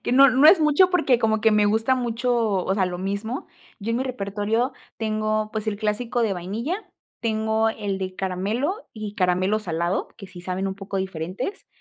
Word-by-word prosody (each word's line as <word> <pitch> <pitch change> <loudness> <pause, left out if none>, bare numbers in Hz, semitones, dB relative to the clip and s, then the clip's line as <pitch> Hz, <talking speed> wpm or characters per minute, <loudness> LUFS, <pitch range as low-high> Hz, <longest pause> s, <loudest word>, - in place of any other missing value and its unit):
que - - -1
no, 275 +2 +8
no 265 +5 +5
es 335 0 +8
mucho 305 +5 +5
porque 280 -9 +3
como 220 -2 +1
que 225 - +4
me 210 -1 +4
gusta 220 +5 +2
mucho, 245 0 -1 0.3
o 190 - 0
sea, 190 -2 +2
lo 180 -1 -4
mismo, 200 +6 -3 0.3
yo 220 +1 -4
en 230 - +1
mi 255 - 0
repertorio 225 +1 -1 0.3
tengo, 215 -1 -1
pues, 220 0 -3
el 215 -1 -1
clásico 230 +3 -1
de 215 -3 +1
vainilla, 210 - -3 0.4
tengo 220 0 +1
el 205 -3 -3
de 185 -1 -4
caramelo 210 - -2
y 215 -3 -6
caramelo 185 +1 +2
salado 170 -2 -2
que 195 - -9
sí 180 -1 -11
saben 185 +2 -2
un 190 - -2
poco 195 0 -5
diferentes, 190 - -4
215 Hz, 195 wpm, -24 LUFS, 195-240 Hz, 0.4 s, no